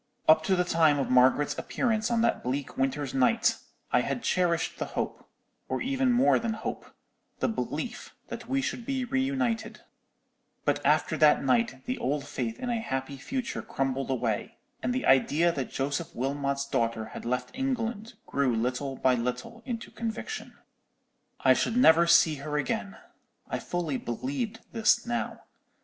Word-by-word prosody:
Up 155 0 +6
to 190 - +3
the 180 - +2
time 165 -4 +3
of 135 - -1
Margaret's 130 +3 +4
appearance 220 -2 0
on 235 -1 +2
that 235 - +2
bleak 135 +3 -3
winter's 135 0 -1
night, 135 - +3 0.3
I - - +4
had 245 - -3
cherished 170 -3 +1
the - - -1
hope—or - - -5
even 265 -1 +1
more 245 +3 +4
than 230 -1 -1
hope—the 220 - -6
belief - - -4
that - - -7
we 270 0 +1
should 245 - -3
be 265 0 -2
reunited: 265 -3 -1 0.8
but - - +1
after - - +2
that - - +5
night 235 0 +1
the 255 +1 -3
old 140 +2 -1
faith 125 -6 -3
in 250 - -3
a 230 -1 -1
happy 135 -6 -3
future 255 - -3
crumbled 135 0 -2
away, 120 -5 -2 0.2
and - - 0
the 255 +1 -1
idea 150 +6 +4
that 135 -6 -3
Joseph 140 +4 -3
Wilmot's 140 +2 -1
daughter 115 -5 -1
had - - -7
left 125 +2 -2
England 235 -4 -2
grew 135 -4 +1
little 125 +4 -1
by 130 0 +3
little 125 - -3
into 235 -2 -4
conviction. 230 - -5 0.8
"I - - +6
should 230 - 0
never 170 -8 +6
see 170 -2 +5
her 150 +2 -3
again. 100 -9 -2 0.5
I - - -2
fully 165 -6 -2
believed 145 - -3
this 230 +1 +3
now. 240 0 -3
165 Hz, 155 wpm, -28 LUFS, -, 0.8 s, Up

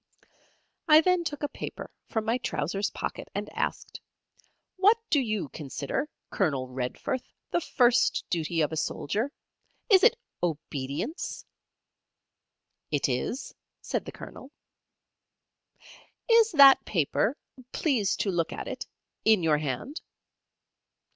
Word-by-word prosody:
I 310 0 +8
then 365 +1 +2
took 295 -3 -5
a - - +2
paper - - -7 0.2
from 220 -2 -1
my 230 +3 +1
trousers 195 - -1
pocket, - - -5
and - - -3
asked: - - -3 0.8
"What 405 +4 +5
do 295 - +5
you 215 - -2
consider, 145 - -4 0.2
Colonel 140 -9 0
Redforth, 130 - -3 0.3
the 345 - +1
first 240 -5 +3
duty 165 -1 0
of 150 - +1
a 160 - -3
soldier? 215 - -1 0.6
Is 380 -2 +8
it 470 +2 +5 0.2
obedience?" 155 - -3 1.4
"It 145 -2 +1
is," 130 - -2 0.3
said - - -2
the - - -6
Colonel. 265 - -10 1.8
"Is 460 -1 +5
that 275 -3 +8
paper 200 - 0 0.3
please 245 - +1
to 195 - +1
look 170 -2 0
at - - -6
it - - -5 0.4
in 220 -5 +4
your 155 -2 +3
hand?" 150 - -4
215 Hz, 120 wpm, -28 LUFS, -, 1.8 s, I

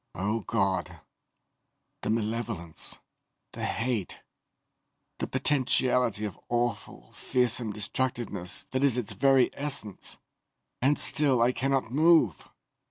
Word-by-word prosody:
Oh 105 +5 -1
God, 95 -1 -1 1.0
the - - -3
malevolence, 110 -6 -3 0.6
the - - -4
hate 115 -5 -2 1.0
the - - -2
potentiality 125 -4 +2
of 100 - -6
awful, 120 -3 -2
fearsome 120 -3 0
destructiveness 105 -3 -2
that 130 - -1
is 135 -4 +3
its 120 -5 -2
very 135 -2 +4
essence! 140 -9 -2 0.6
And 140 +4 +3
still 140 -5 +3
I 120 - +4
cannot 135 -3 -1
move!" 155 - +3
120 Hz, 100 wpm, -28 LUFS, 105-130 Hz, 1.0 s, very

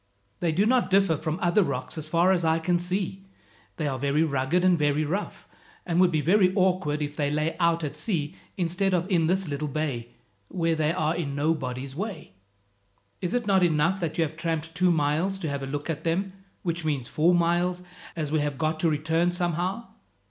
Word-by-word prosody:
"They 170 - +1
do 190 +6 +2
not 250 +2 +2
differ 195 -3 +4
from 155 +1 -3
other 175 +4 +4
rocks, 140 -8 -2
as 155 -1 -3
far 170 +4 +3
as 180 -2 +1
I 160 0 +3
can 175 +2 +1
see. 190 +2 -2 0.5
They 155 - -1
are 135 -2 -2
very 140 +3 +2
rugged 150 +4 +1
and 185 -1 +5
very 150 -1 +1
rough, 190 +8 -4 0.4
and 175 0 +2
would 185 - +5
be 155 -2 +1
very 185 +3 +4
awkward 180 -6 +1
if 145 0 -5
they 145 -1 0
lay 150 +2 -1
out 170 -1 +2
at 150 -1 -4
sea 150 -1 -2 0.2
instead 185 +2 +1
of 175 -1 0
in 165 -3 +3
this 190 +1 +1
little 150 +1 -3
bay, 140 -5 -3 0.4
where 165 - 0
they 155 -1 +1
are 160 -2 0
in 140 -5 -3
nobody's 135 -3 -2
way. 200 - -5 0.9
Is 180 +5 -1
it 245 -2 0
not 195 -2 +3
enough 170 +2 +2
that 165 -3 -3
you 165 - +3
have 160 0 -4
tramped 165 -1 -3
two 180 +2 +2
miles 160 +5 +1
to 170 -5 -3
have 140 -1 -3
a 135 - -4
look 145 +1 -4
at 160 -1 -3
them, 185 +4 -1 0.3
which 170 -2 -2
means 145 -6 -1
four 165 +5 +3
miles, 175 +1 +1 0.3
as 155 -3 -3
we 155 - +2
have 145 -2 -2
got 155 +2 -1
to 165 - +2
return 160 +3 +1
somehow? 180 +5 -1
165 Hz, 205 wpm, -26 LUFS, 150-180 Hz, 0.9 s, and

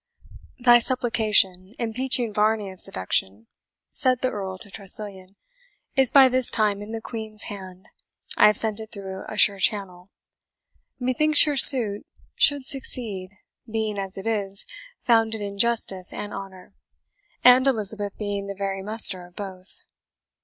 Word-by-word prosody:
"Thy 240 -1 +5
Supplication, 220 -6 0
impeaching 240 0 -2
Varney 210 -1 -1
of 185 - -14
seduction," 95 +3 0 0.5
said 255 -2 +1
the 255 - -1
Earl 190 -2 -6
to 200 +1 -10
Tressilian, 195 -1 -4 0.6
"is 265 -2 +4
by 270 -2 +7
this 255 -1 +2
time 210 -2 -1
in 205 - -10
the 225 0 -6
Queen's 220 -2 -8
hand 190 -1 -12 0.5
I 210 - +5
have 210 -1 +1
sent 220 -1 -1
it 220 -1 -10
through 190 -1 -8
a 215 - -8
sure 200 -1 +4
channel. 185 -2 -3 0.9
Methinks 290 +5 +3
your 295 -1 -2
suit 235 -7 +7 0.3
should 285 -2 +4
succeed, 225 -9 -6 0.4
being, 215 -2 -3
as 195 -1 -7
it 195 - -8
is, 205 -3 0 0.4
founded 225 -2 0
in 200 -1 -7
justice 200 -5 +1
and 205 - -7
honour, 195 -1 -11 0.7
and 250 +2 +5
Elizabeth 210 -4 -2
being 200 -1 -5
the 200 - -7
very 195 0 -5
muster 205 -3 0
of 175 - -25
both. 190 -2 -11
210 Hz, 145 wpm, -23 LUFS, 195-235 Hz, 0.9 s, by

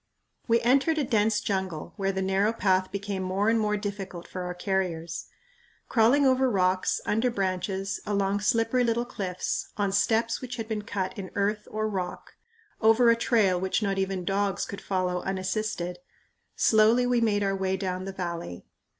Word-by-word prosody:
We 230 0 +4
entered 275 +6 +3
a 300 - +2
dense 220 -3 +2
jungle, 190 -7 -3
where 195 -2 0
the 190 0 -2
narrow 195 +3 +2
path 185 -4 +1
became 200 -1 -3
more 190 +3 0
and 225 0 +3
more 210 -1 +1
difficult 195 -4 -6
for 185 - -6
our 180 0 -4
carriers. 180 -3 -2 0.6
Crawling 250 +5 +4
over 260 0 +4
rocks, 185 -3 +1
under 225 +4 +1
branches, 195 -2 -2
along 200 -1 0
slippery 230 +3 +2
little 235 0 +1
cliffs, 190 -6 -3
on 200 -2 +1
steps 225 +3 +1
which 250 -1 -5
had 225 -2 -5
been 220 -2 -2
cut 195 -2 -3
in 190 -2 -6
earth 210 +1 0
or 215 0 -1
rock, 190 -4 -5 0.5
over 230 +2 +6
a - - +4
trail 210 -7 +2
which 190 +3 0
not 195 -1 0
even 190 -2 -2
dogs 195 0 0
could 200 -1 -7
follow 185 -2 -1
unassisted, 190 -1 -3 0.6
slowly 220 +3 +4
we 245 -1 +2
made 205 -3 +2
our 195 0 +1
way 190 0 -1
down 185 -1 -3
the 195 - -4
valley. 170 - -5
200 Hz, 170 wpm, -27 LUFS, 190-225 Hz, 0.6 s, over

